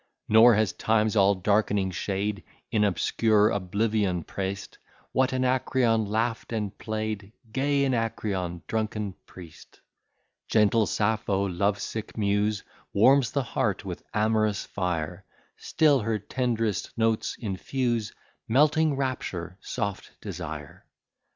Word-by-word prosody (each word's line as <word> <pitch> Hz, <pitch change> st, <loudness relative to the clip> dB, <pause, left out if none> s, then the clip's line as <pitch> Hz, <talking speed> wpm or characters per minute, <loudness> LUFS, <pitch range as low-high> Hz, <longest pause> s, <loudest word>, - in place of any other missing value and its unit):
Nor 110 Hz, +2 st, +7 dB
has 110 Hz, -3 st, +1 dB
Time's 110 Hz, 0 st, +1 dB
all 100 Hz, -1 st, +5 dB
darkening 100 Hz, 0 st, +1 dB
shade 100 Hz, +2 st, -2 dB, 0.3 s
In 105 Hz, -, +2 dB
obscure 105 Hz, +2 st, +3 dB
oblivion 100 Hz, -2 st, 0 dB
press'd 95 Hz, 0 st, -5 dB, 0.3 s
What 130 Hz, 0 st, +2 dB
Anacreon 130 Hz, -3 st, +1 dB
laugh'd 115 Hz, +3 st, -1 dB
and 105 Hz, -4 st, -3 dB
play'd; 110 Hz, -2 st, -4 dB, 0.2 s
Gay 140 Hz, +2 st, +1 dB
Anacreon, 105 Hz, -8 st, -2 dB
drunken 110 Hz, -2 st, -2 dB
priest! 85 Hz, -4 st, -14 dB, 0.7 s
Gentle 110 Hz, 0 st, +3 dB
Sappho, 105 Hz, -2 st, 0 dB
love 100 Hz, +3 st, 0 dB
sick 110 Hz, +1 st, -5 dB
muse, 105 Hz, 0 st, +1 dB, 0.3 s
Warms 130 Hz, +5 st, +5 dB
the 140 Hz, -, 0 dB
heart 110 Hz, -5 st, -1 dB
with 90 Hz, -3 st, -5 dB
amorous 110 Hz, -1 st, +1 dB
fire; 90 Hz, -1 st, -3 dB, 0.3 s
Still 150 Hz, -4 st, +3 dB
her 110 Hz, -1 st, -1 dB
tenderest 115 Hz, 0 st, -2 dB
notes 115 Hz, -1 st, 0 dB
infuse 115 Hz, +2 st, -2 dB, 0.4 s
Melting 150 Hz, +4 st, +3 dB
rapture, 100 Hz, -9 st, -3 dB
soft 100 Hz, -2 st, -5 dB
desire. -, -, -7 dB
110 Hz, 110 wpm, -27 LUFS, 100-115 Hz, 0.7 s, Nor